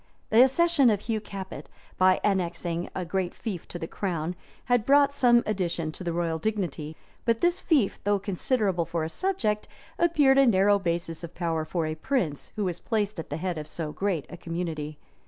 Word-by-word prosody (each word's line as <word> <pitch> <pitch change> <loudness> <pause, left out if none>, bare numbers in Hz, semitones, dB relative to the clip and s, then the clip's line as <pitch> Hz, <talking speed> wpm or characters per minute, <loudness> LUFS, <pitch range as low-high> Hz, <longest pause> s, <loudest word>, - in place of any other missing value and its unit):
The 225 +2 +7
accession 280 0 +4
of 205 -2 +1
Hugh 220 -1 -2
Capet, 195 -2 -8 0.3
by 185 0 +4
annexing 175 -3 -1
a 180 - -2
great 180 +1 -2
fief 195 -7 -5
to - - -6
the 165 - -4
crown, 175 -3 -3 0.3
had 245 -3 +2
brought 280 +2 +5
some 240 -4 +4
addition 175 -6 -1
to 185 - -7
the 170 - -1
royal 165 -1 -1
dignity; 175 -6 -2 0.3
but 230 -1 +1
this 350 +1 +2
fief, 290 - +2
though 205 0 +2
considerable 195 -2 0
for 165 -1 -2
a 160 - -2
subject, 220 - -1 0.3
appeared 295 -6 +4
a 275 - +6
narrow 200 -1 +4
basis 170 -2 -2
of 170 - -8
power 165 -2 -1
for 165 0 -1
a 155 - -2
prince 160 - -2
who 210 - -1
was 180 -3 -2
placed 210 -4 -1
at 160 - -6
the 145 - -3
head 175 -1 -2
of 150 - -7
so 155 -2 -5
great 185 -4 -1
a 175 - -9
community. 165 -3 -4
190 Hz, 190 wpm, -27 LUFS, 170-225 Hz, 0.3 s, The